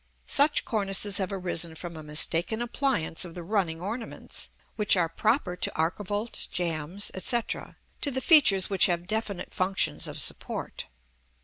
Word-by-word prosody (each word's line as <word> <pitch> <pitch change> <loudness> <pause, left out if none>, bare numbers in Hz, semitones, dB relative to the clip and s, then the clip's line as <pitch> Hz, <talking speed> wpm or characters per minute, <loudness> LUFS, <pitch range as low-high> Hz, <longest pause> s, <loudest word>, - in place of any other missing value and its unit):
Such 290 +1 +3
cornices 200 -1 +2
have 190 0 -2
arisen 175 -4 -1
from 170 0 -7
a 160 - -8
mistaken 165 +7 +1
appliance 240 - 0
of 175 -2 -10
the 175 - -7
running 175 -4 -1
ornaments, 225 +6 -6 0.3
which 210 -2 +3
are 170 -2 +2
proper 205 - -1
to 180 - -1
archivolts, 205 +7 0
jambs, 170 +2 -2
&c., 235 +6 +3
to 290 - -4
the 260 -1 -2
features 260 - +5
which 195 -2 +2
have 175 -1 -2
definite 210 -1 -4
functions 190 +1 -1
of - - -7
support. - - -2
190 Hz, 145 wpm, -27 LUFS, 170-220 Hz, 0.3 s, features